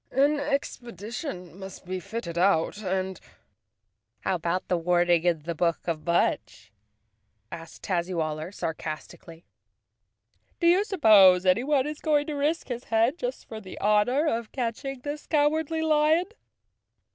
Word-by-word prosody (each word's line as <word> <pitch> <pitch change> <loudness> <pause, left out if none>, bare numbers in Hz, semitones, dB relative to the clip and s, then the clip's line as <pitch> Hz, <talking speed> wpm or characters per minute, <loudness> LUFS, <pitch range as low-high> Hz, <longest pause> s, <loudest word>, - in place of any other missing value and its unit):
"An 285 +3 +2
expedition 235 - -5
must 190 -1 -10
be 185 +1 -4
fit¬ 215 +6 -6
ted 170 -2 -6
out 175 +1 +2
and—" 190 -1 -2 1.0
"How - - 0
about 175 +1 -2
the 180 - +1
warning 175 0 +2
in 165 -4 +1
the 170 +2 -3
book 170 +1 0
of 165 -1 -3
Mudge?" 170 0 0 0.8
asked 165 0 -10
Tazzywaller 170 -3 -2
sarcastically. 165 -1 -7 1.1
"Do 340 - -1
you 355 +4 +5
suppose 205 - +6
anyone 260 +9 +2
is 300 0 -5
going 295 -2 +1
to 305 - -4
risk 295 +3 -1
his 245 -1 -5
head 230 +8 +1
just - - -5
for 220 -1 -8
the 190 -2 -10
honor 215 +8 +2
of 230 -6 -2
catching 255 +2 -4
this 290 +2 -6
Cowardly 315 +1 +1
Lion?" 310 +2 +3
210 Hz, 135 wpm, -26 LUFS, 175-290 Hz, 1.1 s, suppose